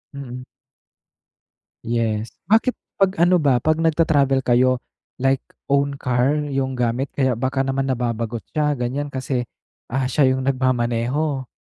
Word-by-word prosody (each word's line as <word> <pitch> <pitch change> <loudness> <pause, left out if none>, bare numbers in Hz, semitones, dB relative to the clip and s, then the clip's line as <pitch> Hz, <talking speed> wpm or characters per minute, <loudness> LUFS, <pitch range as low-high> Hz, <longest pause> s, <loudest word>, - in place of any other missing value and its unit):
Mm. 125 -2 -7 1.4
Yes. 115 -1 -1 0.2
Bakit 225 +4 +4 0.2
'pag 195 -1 +3
ano 180 +1 +5
ba, 140 -7 +2
'pag 155 +3 +2
nagta 165 0 +2
travel 140 -4 +3
kayo 125 0 +3 0.4
like 135 0 +2 0.3
own 140 0 +2
car 125 +2 +1
yung 135 -1 -1
gamit 125 +3 0
kaya 130 -2 +1
baka 130 +2 0
naman 135 0 -1
nababagot 115 -2 -2
siya, 150 -1 +1
ganyan 135 +4 -2
kasi, 130 -1 -2 0.4
ah, 130 +1 0
siya 130 0 +3
yung 130 - -2
nagmamaneho? 130 +2 0
130 Hz, 135 wpm, -21 LUFS, 125-140 Hz, 1.4 s, ano